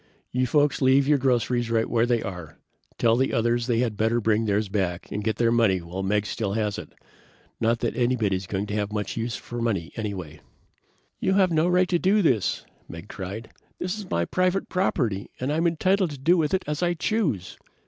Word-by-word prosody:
"You 125 0 +1
folks 145 +2 +2
leave 135 +1 +4
your 145 -1 +4
groceries 120 -2 +1
right 115 -1 +1
where 115 0 +2
they 120 -2 +1
are. 90 -5 -7 0.4
Tell 115 -1 +3
the 130 +2 +1
others 120 +1 +1
they 120 -1 +2
had 115 -4 -1
better 115 +2 +2
bring 110 0 +1
theirs 105 0 +1
back 95 -3 -2
and 105 - -3
get 110 -1 0
their 115 +1 +2
money 110 -6 +3
while 85 +3 -6
Meggs 105 +2 0
still 100 -4 -2
has 105 -1 -1
it. - - -11 0.7
Not 115 +1 +1
that - - -1
anybody 120 -5 +1
is 95 0 -5
going 100 +1 -2
to 105 - -6
have 105 -1 -1
much 105 -2 -3
use 115 0 -2
for 120 0 -6
money, 100 -8 -1
anyway." 90 -8 -5 0.8
"You've 190 -1 +3
no 160 +1 +2
right 180 +1 +3
to 175 -1 +1
do 200 +3 +3
this!" 115 - +1 0.2
Meggs 85 +5 -9
cried. 100 +4 -6 0.3
"This 180 +2 -3
is 210 -3 -8
my 85 0 0
private 185 - 0
property 120 - 0
and 130 +4 -1
I'm 165 +2 +2
entitled 185 +3 +2
to 145 - -7
do 160 +7 +3
with 165 +1 +1
it 190 - -2
as 150 +2 -3
I 175 0 +1
choose!" 160 - -1
115 Hz, 210 wpm, -25 LUFS, 105-150 Hz, 0.8 s, leave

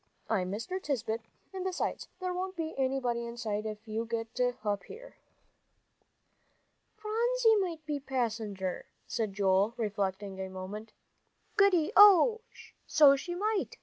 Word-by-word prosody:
"I'm 185 -4 0
Mr. 230 - -4
Tisbett, 230 -7 -2 0.3
and 375 -1 -4
besides, 370 -1 -2
there 365 -1 -2
won't 370 +1 -4
be 325 -2 -3
anybody 260 -3 0
inside 220 -2 -3
if 215 +1 -7
you 220 +1 -2
get 225 0 -4 0.3
up 205 -1 -1
here." - - -12 1.8
"Phronsie 460 +1 +2
might 340 -6 -2
be 295 -1 -2
passenger," 220 -8 -3 0.2
said 215 -5 -3
David, 195 +2 +2
reflecting 200 -2 -2
a 190 - -4
moment. 190 +4 -7 0.6
"Goody, 390 -5 +4
oh, 415 +3 +8 0.5
so 290 -3 +7
she 350 +6 -5
might!" 420 +2 -1
245 Hz, 125 wpm, -31 LUFS, -, 1.8 s, oh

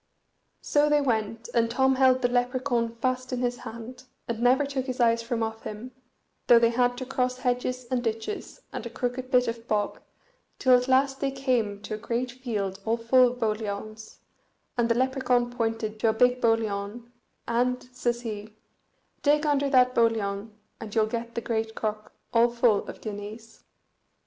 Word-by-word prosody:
So 295 0 +2
they 295 0 +4
went, 225 -4 -1
and 230 -1 +2
Tom 265 +3 +3
held 260 -1 +4
the - - +5
Lepracaun 245 -1 0
fast 255 +2 -2
in 250 -1 -2
his 245 0 0
hand, 245 +3 -9 0.2
and 230 -1 -3
never 255 +4 +4
took 275 -1 -3
his 255 0 -4
eyes 230 -1 +3
from 230 0 -2
off 220 0 -4
him, 215 +4 -7 0.6
though 240 - +8
they 230 0 +4
had 245 +1 +1
to 255 - -4
cross 255 -1 -1
hedges 250 0 -1
and 250 -1 0
ditches, 225 - -4
and - - -4
a 235 - -5
crooked 250 +1 -3
bit 250 -2 +3
of 230 0 -5
bog, 210 -1 -1 0.6
till 255 -1 +5
at 250 +1 +1
last 270 +1 +3
they 275 - 0
came 245 -7 -1
to 210 - -5
a - - -2
great 240 +3 -2
field 210 -7 -3
all 225 +2 0
full 245 +2 +4
of - - -12
boliauns, 215 -1 -4 0.6
and 240 -2 +1
the 230 - +3
Lepracaun 255 -1 +1
pointed 225 -2 -2
to 225 - +3
a - - +2
big 250 +2 +3
boliaun, 225 0 -1 0.4
and 250 +2 +1
says 240 -1 -1
he, 215 -2 -6 0.7
"Dig 295 +1 +3
under 285 -1 +2
that 255 -2 +4
boliaun, 220 -3 +1 0.3
and 220 -1 -8
you'll 220 -1 +4
get 235 +1 -5
the 235 - -1
great 220 -1 -2
crock 215 -1 -4 0.2
all 235 +1 +5
full 235 -3 +2
of - - -9
guineas." 215 +2 -8
240 Hz, 180 wpm, -27 LUFS, 225-255 Hz, 0.7 s, though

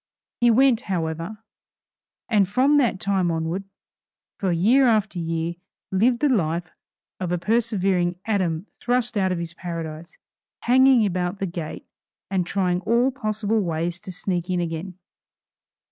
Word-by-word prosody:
He 240 - +5
went 250 0 +5
however, 170 +4 -3 0.8
and 210 -5 +3
from 265 +7 +3
that 240 -9 +2
time 190 -3 +1
onward, 165 +4 -2 0.7
for 190 -4 0
year 230 +11 +4
after 215 -5 +1
year, 165 0 -2 0.3
lived 235 +6 +2
the 295 - +3
life 170 -7 0 0.5
of 180 -2 -3
a 180 - +1
persevering 190 -3 +1
Adam 185 -5 0
thrust 245 -1 0
out 190 -2 +1
of 180 - -1
his 170 -1 -5
paradise, 165 -2 -7 0.4
hanging 255 -1 +5
about 180 0 -1
the 195 - -2
gate 170 -3 -6 0.5
and 185 -3 0
trying 180 -2 0
all 235 +7 +2
possible 215 -3 -1
ways 170 -1 -2
to 185 - -9
sneak 180 0 -3
in 180 -1 0
again. 170 +2 -4
190 Hz, 140 wpm, -23 LUFS, 170-225 Hz, 0.8 s, He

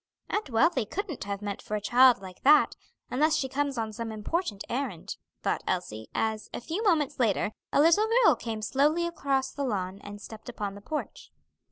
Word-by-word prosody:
"Aunt 420 -7 -1
Wealthy 250 0 +2
couldn't 370 - -4
have 200 0 -4
meant 205 -1 -4
for 210 - -4
a - - 0
child 245 +1 +5
like 185 -1 -10
that, 300 +3 +5 0.4
unless 305 +4 +3
she 280 -3 0
comes 280 0 -1
on 220 -1 -2
some 230 +1 -4
important 220 - -2
errand," 245 - -3 0.3
thought - - 0
Elsie, 110 +1 -3
as, 220 -1 -1
a - - -3
few 325 - -4
moments 320 - +2
later, 215 -3 +2 0.2
a - - +3
little 335 +8 +5 0.2
girl - - +7
came 220 -2 -5
slowly 300 +8 +2
across 275 -5 -1
the 285 - -4
lawn 195 -6 -2
and 205 0 -8
stepped 220 +3 -10
upon 210 -4 -4
the 200 - -11
porch. 305 +8 -5
245 Hz, 190 wpm, -28 LUFS, 210-300 Hz, 0.4 s, girl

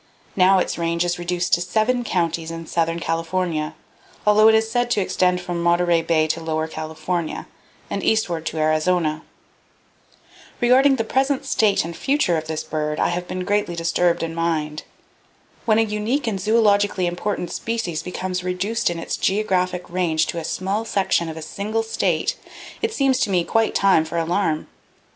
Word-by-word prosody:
Now 190 0 +5
its 180 - -1
range 170 +1 0
is 175 0 -1
reduced 175 0 -1
to 175 - +4
seven 220 +7 +1
counties 170 -5 -1
in 165 0 -6
southern 165 +1 -1
California, 165 -1 -2 0.5
although 210 +1 +6
it 220 - +6
is 220 0 +2
said 245 +1 0
to 230 - +2
extend 185 -1 +1
from 175 -1 -4
Monterey 175 0 +3
Bay 160 -1 +2
to 165 - -1
Lower 160 -1 -2
California, 160 +1 -4 0.4
and - - -4
eastward 175 -7 +1
to 160 - -4
Arizona. 155 0 +1 1.4
Regarding 265 +3 +5
the 225 - -1
present 270 +3 0
status 215 -9 +2
and 170 - -5
the - - -11
future 270 - +1
of 155 -1 -3
this 160 -1 -3
bird, 150 0 -3
I - - +2
have 175 +1 -3
been 185 0 -4
greatly 205 -3 0
disturbed 170 +1 +1
in 165 0 -3
mind. 155 -2 -1 0.8
When 220 -1 +3
a 225 - +4
unique 220 +6 -1
and 210 -4 -1
zoologically 205 -3 +2
important 175 +1 -3
species 225 -9 -3
becomes 180 0 -4
reduced 185 +5 -1
in 170 - -3
its 165 - -3
geographic 185 -3 0
range 170 -3 +1
to 170 - -3
a - - -6
small 195 +6 -2
section 190 -6 0
of 160 - -7
a 160 - -6
single 215 +7 -2
state, 225 - 0 0.5
it 450 - 0
seems 270 -8 +2
to - - +1
me 180 -3 +2
quite 225 +5 +1
time 190 -5 +4
for 160 +1 -4
alarm. 165 -1 0
180 Hz, 175 wpm, -22 LUFS, 165-210 Hz, 1.4 s, although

